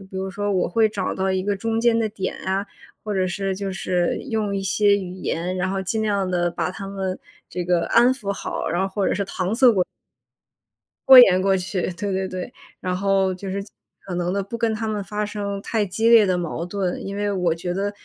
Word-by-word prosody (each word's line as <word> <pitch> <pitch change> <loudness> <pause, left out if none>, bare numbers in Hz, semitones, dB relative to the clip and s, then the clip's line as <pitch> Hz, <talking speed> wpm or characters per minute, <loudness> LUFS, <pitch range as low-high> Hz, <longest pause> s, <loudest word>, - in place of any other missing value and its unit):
突， 195 - -11
就 190 - -19
比 190 - -7
如 190 0 -3
说 205 +1 -2
我 185 -2 +1
会 220 +4 +3
找 205 -3 -3
到 190 0 0
一 190 0 0
个 205 -1 0
中 225 +2 -1
间 235 -1 +3
的 220 -1 +1
点 195 -3 -4
啊， 195 +2 -2 0.4
或 210 - -2
者 185 -1 +1
是， 190 +1 -2
就 195 0 -4
是 180 -2 0
用 215 -3 -1
一 195 - -2
些 200 +1 +3
语 185 -2 -5
言， 185 0 -3
然 185 +1 -1
后 195 0 -1
尽 220 +4 -1
量 200 -3 0
地 175 -1 +1
把 170 +1 -2
他 195 +1 -7
们 190 -1 -3 0.3
这 180 - -4
个 175 -1 +1
安 245 +2 +5
抚 205 -6 -3
好， - - -4
然 175 +3 0
后 195 - 0
或 195 0 -1
者 - - +1
是 200 +1 -1
搪 190 +2 -2
塞 250 -1 +6
过 185 -3 +1 1.2
拖 265 -1 +11
延 185 -7 +8
过 195 0 +3
去， 185 0 -2
对 200 +3 -3
对 190 0 -1
对。 185 +6 -6 0.3
然 185 0 -2
后 195 -1 +1
就 190 +1 -7
是 195 +1 -3
尽 205 - -17 0.3
可 180 -2 -4
能 175 +1 -1
地 200 -1 -1
不 230 +4 -6
跟 230 -1 +1
他 220 +1 -3
们 210 -1 -2
发 210 +1 -3
生 200 -1 -4
太 215 -1 0
激 225 +5 +1
烈 230 -3 +7
的 185 -2 +1
矛 170 -1 -3
盾。 185 -1 -3
因 200 +1 -5
为 205 0 -1
我 180 -4 +1
觉 175 +1 -4
得 200 +2 -1
195 Hz, 265 characters per minute, -23 LUFS, 185-205 Hz, 1.2 s, 拖